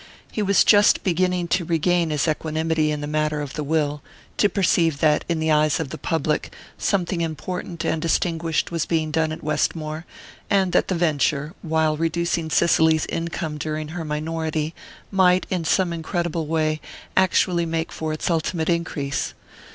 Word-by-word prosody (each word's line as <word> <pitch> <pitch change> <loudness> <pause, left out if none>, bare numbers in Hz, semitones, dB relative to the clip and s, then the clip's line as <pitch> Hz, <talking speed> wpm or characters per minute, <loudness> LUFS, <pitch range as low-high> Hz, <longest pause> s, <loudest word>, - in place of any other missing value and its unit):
He 215 - -2
was 200 -1 +4
just 205 -1 +5
beginning 180 -1 +1
to 180 +1 +1
regain 170 +1 +1
his 150 +1 0
equanimity 160 0 0
in 150 -1 -2
the - - -3
matter 155 0 0
of 145 -2 -5
the 150 - -3
will 150 -1 0 0.4
to 205 - +4
perceive 170 -6 +2
that, 150 0 +3
in 170 -1 0
the 160 0 +1
eyes 150 -1 +3
of 160 -4 -3
the - - -5
public, 160 -2 -1 0.2
something 180 -3 0
important 165 +2 -4
and 160 - 0
distinguished 165 0 0
was 165 -2 -1
being 160 -2 0
done 160 0 +1
at 160 +1 -7
Westmore, 155 +1 -2 0.4
and 190 -2 +2
that - - +2
the 185 - 0
venture, 155 -2 0
while 160 -2 +1
reducing 165 0 -1
Cicely's 160 0 +3
income 165 -2 -3
during 155 0 -3
her 170 +1 -5
minority, 155 0 -2 0.4
might, 185 -2 +4
in 180 -3 0
some 175 +2 +2
incredible 170 -1 -2
way, 155 -1 0 0.3
actually 180 -2 +3
make 165 0 -2
for 160 -1 -3
its 155 - -3
ultimate 160 0 -1
increase. 155 -5 -2
160 Hz, 165 wpm, -23 LUFS, 155-170 Hz, 0.4 s, just